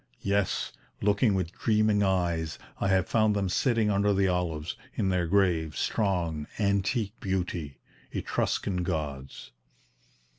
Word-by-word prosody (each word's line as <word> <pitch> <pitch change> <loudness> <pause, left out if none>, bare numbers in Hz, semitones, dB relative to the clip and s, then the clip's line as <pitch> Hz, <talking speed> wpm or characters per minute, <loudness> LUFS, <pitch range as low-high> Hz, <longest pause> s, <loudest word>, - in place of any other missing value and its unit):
Yes, 100 -1 0 0.3
looking 105 +1 +3
with 90 -3 -1
dreaming 105 0 +2
eyes, 85 -5 0 0.2
I - - 0
have 95 -2 +2
found 110 -2 +3
them 100 -2 0
sitting 115 +2 +2
under 100 0 +2
the 95 0 +3
olives, 85 -4 -1 0.2
in 95 - +1
their 90 -2 +1
grave, 85 -5 +2
strong, 85 -7 0
antique 100 +1 +1
beauty 90 -6 -3 0.3
Etruscan 90 -3 -1
gods!" 75 -6 -4
95 Hz, 120 wpm, -28 LUFS, 85-100 Hz, 0.3 s, looking